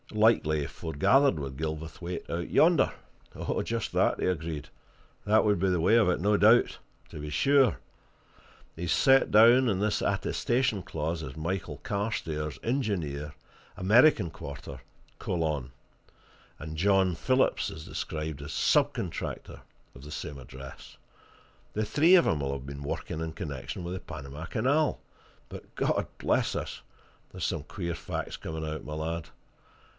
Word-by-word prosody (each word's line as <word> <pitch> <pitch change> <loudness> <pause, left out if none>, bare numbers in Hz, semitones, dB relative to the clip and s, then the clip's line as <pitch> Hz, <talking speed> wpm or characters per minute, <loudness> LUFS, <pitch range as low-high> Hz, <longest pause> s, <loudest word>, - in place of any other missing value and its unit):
"Likely 105 -9 +3
he - - -2
foregathered 95 - +2
with 70 -2 -6
Gilverthwaite 80 +3 -5
out 85 +1 -3
yonder." 165 -3 +4 0.7
"Just - - -3
that," - - +2
he - - 0
agreed. 80 -4 -2 0.6
"That 110 +2 +4
would 105 -1 +3
be 95 +2 +2
the 90 -2 +1
way 105 +7 +4
of 115 -5 +5
it, 90 - +1
no 105 +4 +2
doubt. 110 +4 +4 0.3
To - - -9
be 75 0 -5
sure! 135 - +3 1.0
He's 85 0 -3
set 135 - +4
down 120 +4 +7
in 95 -3 0
this 105 +1 0
attestation 120 -4 0
clause 80 +1 -3
as 65 0 -8
Michael 90 +4 -3
Carstairs, 80 - -3
engineer, 85 - -2 0.4
American 105 - +5
Quarter, 70 -3 -8 0.4
Colon; 75 -7 -2 0.9
and 80 +2 -7
John 95 +1 +3
Phillips 130 +8 +1
is 80 -1 -9
described 75 -2 -4
as 70 - -7
sub - - +3
contractor, - - -5 0.3
of 65 - -12
the 75 - -10
same 75 -2 -6
address. 65 +1 -11 0.8
The 110 +1 -1
three 155 - +5
of 175 - +5
'em'll 70 -3 0
have 70 -1 -5
been 70 +1 -7
working 80 +2 -4
in 80 0 -3
connection 70 +2 -6
with 90 - -4
the 95 - -4
Panama 70 +3 -8
Canal. 135 - +1 0.5
But - - -11
God - - 0
bless - - +1
us! - - -5 0.5
there's - - -4
some - - -2
queer 85 -1 -4
facts - - -5
coming 80 0 -5
out, 80 0 -5
my 75 - -7
lad! 80 +1 -4
85 Hz, 150 wpm, -28 LUFS, 75-110 Hz, 1.0 s, down